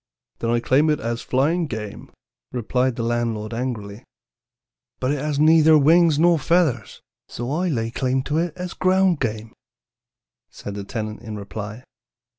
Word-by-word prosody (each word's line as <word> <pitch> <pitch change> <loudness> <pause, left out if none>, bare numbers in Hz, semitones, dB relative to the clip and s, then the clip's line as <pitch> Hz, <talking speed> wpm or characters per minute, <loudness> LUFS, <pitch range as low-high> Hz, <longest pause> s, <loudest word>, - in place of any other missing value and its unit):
"'Then 115 - -2
I 120 0 +2
claim 135 +6 +2
it 150 - +1
as 115 +1 -3
flying 155 +6 +1
game,' 105 -5 -7 0.4
replied 125 +1 0
the 115 - -3
landlord 115 -2 -2
angrily. 115 -4 -4 1.0
"'But 130 - 0
it 145 - -1
has 150 0 -2
neither 155 0 +6
wings 160 +1 +5
nor 170 +1 +4
feathers, 145 - 0 0.3
so 120 +2 -5
I 175 +4 0
lay 115 -6 -2
claim 130 +1 -1
to 150 +3 -1
it 170 0 -2
as 180 -1 -5
ground 185 -3 +2
game,' 110 -2 -3 1.0
said 100 - -8
the 100 0 -5
tenant 110 0 -5
in 110 -2 -7
reply. 105 +3 -7
130 Hz, 155 wpm, -22 LUFS, 115-155 Hz, 1.0 s, neither